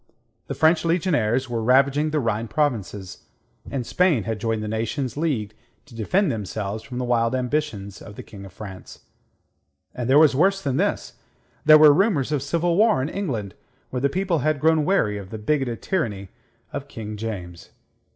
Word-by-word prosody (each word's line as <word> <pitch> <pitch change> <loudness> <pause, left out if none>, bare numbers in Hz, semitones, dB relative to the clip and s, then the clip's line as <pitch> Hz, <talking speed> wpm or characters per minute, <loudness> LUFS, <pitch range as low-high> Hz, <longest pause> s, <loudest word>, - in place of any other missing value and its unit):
The - - -4
French 160 +1 +3
legionaries 145 - +1
were 120 -2 -2
ravaging 135 +5 +3
the 155 0 0
Rhine 115 -3 -1
provinces, 110 -10 -3 0.4
and 130 -3 -3
Spain 170 - +2
had 110 0 -3
joined 110 0 -1
the - - -4
nations 115 +4 -3
leagued 135 -10 -2 0.3
to 140 - -17
defend 150 - +1
themselves 105 0 -4
from 125 0 -8
the 125 - -2
wild 115 0 +1
ambitions 125 -7 -3
of 105 - -11
the - - -8
King 100 -2 -12
of 95 - -11
France. 95 -1 -10 0.9
And 125 0 -4
there 135 - +6
was 150 -3 +6
worse 195 +7 +3
than 140 -6 -2
this: - - -1 0.5
there 155 0 +9
were 150 -1 +8
rumours 155 - +1
of 145 -3 0
civil 170 +4 0
war 220 -3 +4
in 145 - -2
England, 120 - -4 0.4
where 125 - -3
the 140 - +2
people 185 0 0
had 155 +1 0
grown 160 +1 +3
weary 110 - +1
of 95 -2 -10
the 110 - -6
bigoted 125 +1 -1
tyranny 105 - -2 0.4
of - - -5
King 105 -1 -7
James. 95 -6 -7
130 Hz, 180 wpm, -23 LUFS, 110-155 Hz, 0.9 s, there